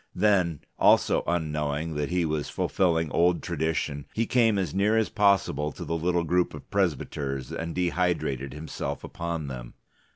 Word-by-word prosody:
Then, 90 -6 +2 0.2
also - - +4
unknowing 75 -2 -1
that 75 -1 -2
he 90 -1 +1
was 75 -2 -2
fulfilling 80 -4 +1
old 85 +1 +2
tradition, 80 -4 -2
he 115 - +1
came 115 -3 +3
as 95 -6 -1
near 105 +3 +2
as 110 - +2
possible 95 -8 +2
to - - -7
the 85 - -2
little 85 +1 +1
group 90 +1 +1
of - - -12
presbyters 70 -8 -1
and 85 0 -4
dehydrated 85 -7 0
himself 75 +3 -5
upon 85 -2 -4
them. 60 -3 -7
85 Hz, 155 wpm, -27 LUFS, 75-90 Hz, 0.2 s, also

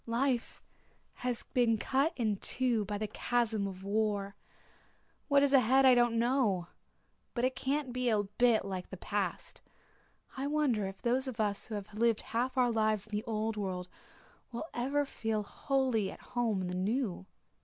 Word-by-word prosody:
Life 245 +1 -1 0.5
has 245 -1 -3
been 235 -3 +3
cut 275 +8 +1
in 215 -5 0
two 240 -1 0
by 205 +1 -3
the 215 - -2
chasm 220 -2 0
of 190 -1 -8
war. 200 -1 0 0.9
What 280 -1 +5
is 285 0 +2
ahead 265 +1 +5
I 260 - +8
don't 240 -1 +3
know 230 -8 +1 0.7
but 240 - -1
it 255 0 +1
can't 270 0 -1
be 250 -1 0
a 210 -2 +2
bit 220 +2 +2
like 185 -2 -5
the 190 - -7
past. 200 -2 -3 0.7
I 270 +1 -2
wonder 280 -9 +1
if 195 0 -9
those 255 +3 +1
of 245 -3 -6
us 205 -2 0
who 220 - -5
have 205 0 -7
lived 225 0 +2
half 245 +4 -2
our 245 -1 +4
lives 215 -2 +1
in 215 - -19
the 210 - -1
old 220 -1 -2
world 185 -3 -3 0.6
will 235 +6 -4
ever 275 +4 0
feel 220 -5 -2
wholly 255 -3 0
at - - -10
home 230 -5 +1
in 185 - -2
the 180 - -4
new." 190 0 -1
230 Hz, 175 wpm, -32 LUFS, 205-255 Hz, 0.9 s, I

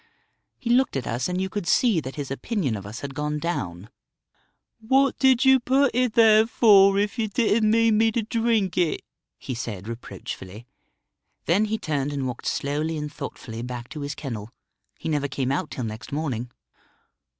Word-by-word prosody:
He 235 -3 -2
looked 260 - +3
at 130 -3 -2
us, 125 +7 -2
and 180 0 -1
you 190 - 0
could 190 -2 -5
see 225 -3 +3
that 135 -3 -7
his 140 -3 -5
opinion 140 - -2
of 100 -1 -7
us 110 +5 -8
had 140 -1 -6
gone 150 +2 -2
down. 100 - -4 0.9
'What 265 +4 +2
did 265 -1 +4
you 265 0 +7
put 265 +2 +2
it 250 -1 +1
there 220 -1 +6
for, 200 -4 +6
if 205 +4 -1
you 220 - +1
didn't 215 0 +2
mean 225 -1 +4
me 225 0 +4
to 230 - 0
drink 225 -4 0
it?' 170 -3 0 0.3
he 130 - -6
said 110 -4 -6
reproachfully. 115 -2 -8 0.8
Then 195 +6 +3
he 220 +1 -1
turned 145 -6 -2
and 140 -2 -2
walked 125 -2 -5
slowly 150 +3 -1
and 150 0 -5
thoughtfully 120 -5 -7
back 125 0 -6
to 155 - -7
his 140 0 -4
kennel. 115 -7 -6 0.5
He - - -7
never 145 -3 0
came 130 -1 -2
out 150 +3 -1
till 130 - -5
next 110 0 -6
morning." 135 -5 -3
160 Hz, 185 wpm, -24 LUFS, -, 0.9 s, you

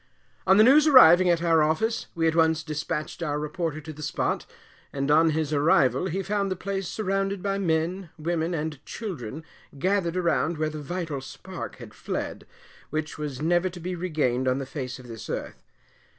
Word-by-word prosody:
On 190 - +6
the 215 - +8
news 290 +6 +6
arriving 185 - +8
at 170 -1 +2
our 165 -2 +4
office, 160 +10 0
we 165 -1 +1
at 160 - +1
once 160 -1 +3
dispatched 155 +1 -4
our 150 -3 -1
reporter 155 +1 -3
to 155 +1 -8
the 150 - -11
spot, 145 0 -2 0.4
and 140 +1 -1
on 160 +2 +5
his 155 -1 -1
arrival 145 +2 +3
he 190 +2 -2
found 200 +1 -1
the 185 - -1
place 195 0 -3
surrounded 195 -1 -2
by 200 0 -1
men, 170 +1 -1
women, 165 +1 -1
and 150 -2 -4
children, 160 - -6 0.3
gathered 185 +2 0
around 170 -2 +1
where 155 0 -1
the 155 0 -6
vital 160 -2 -4
spark 135 - -8
had - - -12
fled, - - -5 0.4
which 155 0 -4
was 150 -2 -4
never 175 +3 +2
to 175 0 -10
be 180 +2 -4
regained 150 -8 0
on 130 0 +2
the 135 - -3
face 130 -3 -5
of 125 -2 -13
this 115 -3 -9
earth. - - -5
160 Hz, 185 wpm, -26 LUFS, 150-185 Hz, 0.4 s, the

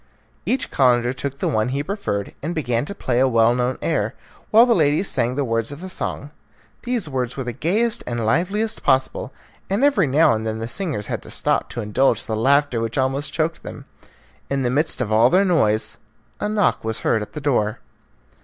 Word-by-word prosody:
Each 260 - -1
Calender 125 -2 +3
took 140 +1 -4
the - - -1
one 110 +2 +1
he 140 +2 -2
preferred, 150 - -3
and 165 +5 -3
began 125 -5 -1
to 200 - -6
play 125 -9 -1
a 135 - +4
well 115 -1 +4
known 125 +1 -1
air, - - -1 0.3
while 225 +2 +7
the 240 - +3
ladies 155 +1 +2
sang 120 +2 -1
the 140 0 0
words 115 +1 -1
of 145 - -8
the 185 +2 -7
song. 145 -5 -5 0.5
These 245 -7 -2
words 130 -3 -3
were 135 - -2
the 120 -1 -4
gayest 210 - 0
and 120 -2 -2
liveliest 195 - 0
possible, 130 -1 +1 0.4
and 200 +7 0
every 240 - +4
now 140 -1 +4
and 110 0 -2
then 110 0 -3
the 115 +1 -4
singers 145 - -3
had - - -4
to - - -13
stop - - 0
to 120 - -5
indulge 110 +6 +1
the 110 - -2
laughter 135 +1 +2
which 115 0 -3
almost 135 +2 0
choked 160 0 -1
them. - - -9 0.6
In 140 -1 0
the 120 - 0
midst 150 0 0
of 110 -3 -2
all 115 +3 +5
their 190 +5 +4
noise, 110 - +1 0.4
a 210 - -1
knock 210 -2 +1
was 110 0 -3
heard 110 - +1
at 105 - -8
the 150 - -5
door. 115 -7 +1
135 Hz, 210 wpm, -21 LUFS, 115-170 Hz, 0.6 s, while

